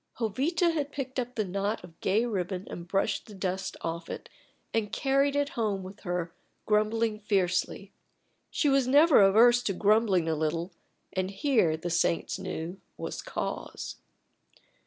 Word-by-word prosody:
Jovita 285 Hz, -, +1 dB
had 290 Hz, -3 st, -2 dB
picked 265 Hz, -2 st, -4 dB
up 245 Hz, 0 st, -4 dB
the 215 Hz, -, 0 dB
knot 200 Hz, +3 st, -2 dB
of 170 Hz, -2 st, -14 dB
gay 210 Hz, +5 st, +2 dB
ribbon 190 Hz, -4 st, -2 dB
and 170 Hz, 0 st, -7 dB
brushed 195 Hz, +5 st, 0 dB
the 210 Hz, -, -11 dB
dust 190 Hz, 0 st, -3 dB
off 165 Hz, 0 st, -4 dB
it, -, -, -7 dB, 0.4 s
and 220 Hz, -2 st, 0 dB
carried 275 Hz, +1 st, +2 dB
it 285 Hz, 0 st, +1 dB
home 215 Hz, -, -1 dB
with 190 Hz, +2 st, -10 dB
her, 175 Hz, -3 st, -3 dB, 0.3 s
grumbling 215 Hz, +1 st, +1 dB
fiercely. 195 Hz, -1 st, 0 dB, 0.6 s
She 300 Hz, -, 0 dB
was 275 Hz, -2 st, +3 dB
never 290 Hz, 0 st, +6 dB
averse 230 Hz, +5 st, +6 dB
to 200 Hz, -, -1 dB
grumbling 205 Hz, -3 st, +3 dB
a 160 Hz, -, +1 dB
little, 160 Hz, +3 st, -1 dB, 0.4 s
and 185 Hz, 0 st, -1 dB
here, 195 Hz, -, +2 dB
the 175 Hz, +2 st, -4 dB
saints 170 Hz, 0 st, +1 dB
knew, 170 Hz, +4 st, -5 dB, 0.2 s
was -, -, -5 dB
cause. -, -, -5 dB
205 Hz, 155 wpm, -29 LUFS, 180-245 Hz, 0.6 s, never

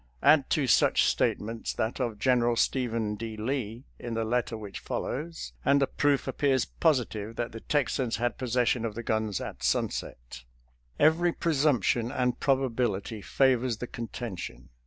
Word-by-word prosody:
Add 145 Hz, -3 st, +5 dB
to 150 Hz, -, +2 dB
such 125 Hz, -, +4 dB
statements 115 Hz, +2 st, 0 dB
that 110 Hz, +4 st, -2 dB
of 120 Hz, -4 st, -2 dB
General 120 Hz, 0 st, +2 dB
Stephen 115 Hz, -4 st, 0 dB
D. 110 Hz, +1 st, -6 dB
Lee 115 Hz, 0 st, -3 dB, 0.2 s
in 120 Hz, -1 st, -5 dB
the 115 Hz, 0 st, -1 dB
letter 120 Hz, 0 st, -1 dB
which 105 Hz, -2 st, -7 dB
follows, 160 Hz, +4 st, -4 dB
and 140 Hz, +1 st, +4 dB
the 135 Hz, -, +3 dB
proof 145 Hz, 0 st, +1 dB
appears 130 Hz, -1 st, +1 dB
positive 115 Hz, -8 st, 0 dB
that 120 Hz, 0 st, -3 dB
the 115 Hz, -, -7 dB
Texans 130 Hz, -3 st, 0 dB
had 120 Hz, +1 st, -2 dB
possession 125 Hz, -1 st, +1 dB
of 110 Hz, -3 st, -3 dB
the 120 Hz, -, -5 dB
guns 110 Hz, -3 st, -1 dB
at -, -, -7 dB
sunset. -, -, -2 dB, 0.6 s
Every 165 Hz, +3 st, +4 dB
presumption 135 Hz, -, +1 dB
and 125 Hz, -3 st, 0 dB
probability 120 Hz, -6 st, 0 dB
favors 130 Hz, -1 st, +2 dB
the 125 Hz, -, -4 dB
contention. 115 Hz, -5 st, -7 dB
120 Hz, 150 wpm, -28 LUFS, 110-135 Hz, 0.6 s, Add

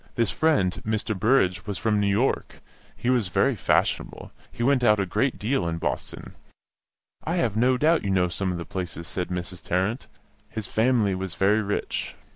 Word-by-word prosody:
This 115 Hz, -5 st, +1 dB
friend, 100 Hz, -, +1 dB
Mr. 110 Hz, 0 st, -1 dB
Burrage, 100 Hz, -2 st, +2 dB
was 100 Hz, -2 st, -3 dB
from 110 Hz, -2 st, +1 dB
New 100 Hz, -, +1 dB
York; 105 Hz, +7 st, 0 dB, 0.4 s
he 125 Hz, -, 0 dB
was 120 Hz, -6 st, +2 dB
very 90 Hz, -, +2 dB
fashionable, -, -, 0 dB, 0.2 s
he 120 Hz, -, -4 dB
went 130 Hz, 0 st, +3 dB
out 105 Hz, -3 st, +5 dB
a 100 Hz, -, +1 dB
great 130 Hz, +8 st, 0 dB
deal 115 Hz, -3 st, 0 dB
in 80 Hz, 0 st, -2 dB
Boston -, -, -4 dB, 0.9 s
("I 165 Hz, -, -1 dB
have 120 Hz, -, 0 dB
no 125 Hz, +3 st, +3 dB
doubt 160 Hz, +4 st, +3 dB
you 100 Hz, -, -2 dB
know 90 Hz, -2 st, +2 dB
some 95 Hz, +2 st, -2 dB
of 90 Hz, -, -3 dB
the 85 Hz, -, -6 dB
places," 85 Hz, -3 st, -5 dB
said 90 Hz, -1 st, -3 dB
Mrs. 90 Hz, 0 st, -5 dB
Tarrant); 95 Hz, +8 st, -1 dB, 0.4 s
his 110 Hz, -2 st, -5 dB
"fam'ly" 110 Hz, -2 st, +2 dB
was 95 Hz, -2 st, -4 dB
very 105 Hz, +3 st, +3 dB
rich. 105 Hz, 0 st, -3 dB
105 Hz, 185 wpm, -25 LUFS, 95-120 Hz, 0.9 s, out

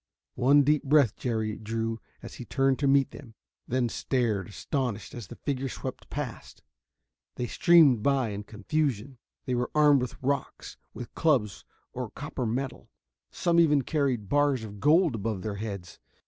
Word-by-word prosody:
One 140 Hz, +3 st, +4 dB
deep 150 Hz, +1 st, +3 dB
breath 140 Hz, -6 st, +4 dB
Jerry 110 Hz, -3 st, -2 dB
drew 115 Hz, +1 st, -3 dB, 0.2 s
as -, -, -9 dB
he -, -, -7 dB
turned 135 Hz, 0 st, +1 dB
to 140 Hz, -, +1 dB
meet 135 Hz, -1 st, +3 dB
them. 115 Hz, -5 st, -12 dB, 0.3 s
Then 125 Hz, 0 st, +1 dB
stared, 115 Hz, -6 st, -1 dB
astonished, 115 Hz, 0 st, -3 dB
as 120 Hz, -6 st, -8 dB
the -, -, -10 dB
figures 135 Hz, -2 st, -3 dB
swept -, -, -7 dB
past. -, -, -6 dB, 0.7 s
They 125 Hz, -, -2 dB
streamed 150 Hz, -4 st, +5 dB
by 135 Hz, -1 st, +1 dB
in 105 Hz, 0 st, -6 dB
confusion. 125 Hz, +2 st, -2 dB, 0.3 s
They 130 Hz, -, -1 dB
were 120 Hz, 0 st, -1 dB
armed 145 Hz, -3 st, +5 dB
with 125 Hz, -, -4 dB
rocks, 140 Hz, 0 st, -3 dB, 0.2 s
with 120 Hz, -2 st, -8 dB
clubs 130 Hz, -11 st, +1 dB, 0.3 s
or 125 Hz, -2 st, -4 dB
copper 135 Hz, -1 st, -5 dB
metal 130 Hz, +4 st, -4 dB, 0.4 s
some 170 Hz, -1 st, +1 dB
even 150 Hz, -4 st, +4 dB
carried 135 Hz, -9 st, -1 dB
bars 145 Hz, -1 st, +2 dB
of 105 Hz, -2 st, -9 dB
gold 160 Hz, -, +4 dB
above 105 Hz, -3 st, -3 dB
their 105 Hz, -2 st, -4 dB
heads. 100 Hz, -4 st, -6 dB
125 Hz, 160 wpm, -28 LUFS, 110-140 Hz, 0.7 s, streamed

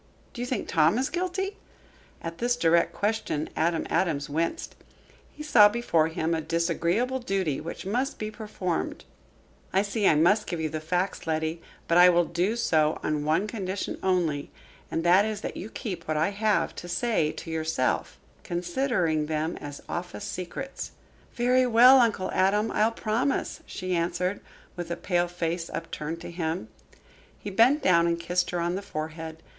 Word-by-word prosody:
"Do 245 Hz, -, -6 dB
you 245 Hz, -, -2 dB
think 255 Hz, -, -2 dB
Tom 160 Hz, +4 st, +3 dB
is 260 Hz, +1 st, 0 dB
guilty?" 370 Hz, +3 st, -2 dB, 0.7 s
At 165 Hz, 0 st, -6 dB
this 245 Hz, +1 st, +1 dB
direct 170 Hz, -6 st, +3 dB
question 205 Hz, -8 st, -2 dB
Adam 165 Hz, 0 st, +1 dB
Adams 145 Hz, -6 st, 0 dB
winced. 165 Hz, -, -2 dB, 0.6 s
He 300 Hz, -, -9 dB
saw 225 Hz, -9 st, +7 dB
before 190 Hz, -9 st, +1 dB
him 160 Hz, 0 st, -1 dB
a 160 Hz, -, 0 dB
disagreeable 170 Hz, +10 st, 0 dB
duty 195 Hz, -, -1 dB
which 165 Hz, +4 st, -7 dB
must 245 Hz, +7 st, -1 dB
be 215 Hz, 0 st, -4 dB
performed. 205 Hz, -6 st, -4 dB, 0.7 s
"I 190 Hz, +1 st, +3 dB
see 205 Hz, 0 st, 0 dB
I -, -, +5 dB
must 200 Hz, +8 st, +3 dB
give 170 Hz, -, -3 dB
you 160 Hz, -1 st, -1 dB
the 155 Hz, +1 st, -3 dB
facts, 175 Hz, +3 st, -2 dB
Letty. 160 Hz, +1 st, -1 dB, 0.3 s
But 170 Hz, +1 st, +4 dB
I 180 Hz, 0 st, +9 dB
will 175 Hz, -1 st, +4 dB
do 180 Hz, +7 st, 0 dB
so 160 Hz, -9 st, +2 dB
on 150 Hz, -1 st, -1 dB
one 160 Hz, +6 st, +2 dB
condition 200 Hz, -3 st, -4 dB
only, 170 Hz, -6 st, 0 dB, 0.4 s
and 165 Hz, -, -2 dB
that 180 Hz, +3 st, +6 dB
is, 215 Hz, -1 st, -3 dB
that -, -, -5 dB
you 210 Hz, -, -6 dB
keep 185 Hz, -8 st, -6 dB
what 155 Hz, 0 st, 0 dB
I 160 Hz, +5 st, +2 dB
have 210 Hz, +1 st, +1 dB
to 175 Hz, -, -7 dB
say 175 Hz, -4 st, +1 dB
to 165 Hz, -, -7 dB
yourself 160 Hz, -, -1 dB, 0.3 s
considering 175 Hz, -, 0 dB
them 155 Hz, +1 st, -1 dB
as 145 Hz, 0 st, -8 dB
office 180 Hz, +3 st, -5 dB
secrets." 185 Hz, +9 st, -6 dB, 0.4 s
"Very 250 Hz, +1 st, +3 dB
well, 250 Hz, +3 st, +8 dB
Uncle 220 Hz, -6 st, +1 dB
Adam, 205 Hz, +3 st, +2 dB
I'll 215 Hz, -, +3 dB
promise," 235 Hz, +5 st, -1 dB
she 185 Hz, -1 st, -3 dB
answered, 175 Hz, +3 st, -1 dB, 0.3 s
with 175 Hz, -1 st, -5 dB
a 170 Hz, -, -1 dB
pale 175 Hz, -2 st, 0 dB
face 170 Hz, -1 st, -3 dB
upturned 165 Hz, 0 st, -5 dB
to -, -, -7 dB
him. 165 Hz, +1 st, -3 dB, 0.7 s
He 205 Hz, -, -7 dB
bent 245 Hz, +9 st, +4 dB
down 170 Hz, -2 st, +4 dB
and 170 Hz, 0 st, 0 dB
kissed 175 Hz, +2 st, 0 dB
her 175 Hz, -, -2 dB
on 170 Hz, +1 st, 0 dB
the 190 Hz, -, -3 dB
forehead. 160 Hz, -2 st, -6 dB
175 Hz, 170 wpm, -27 LUFS, 165-215 Hz, 0.7 s, I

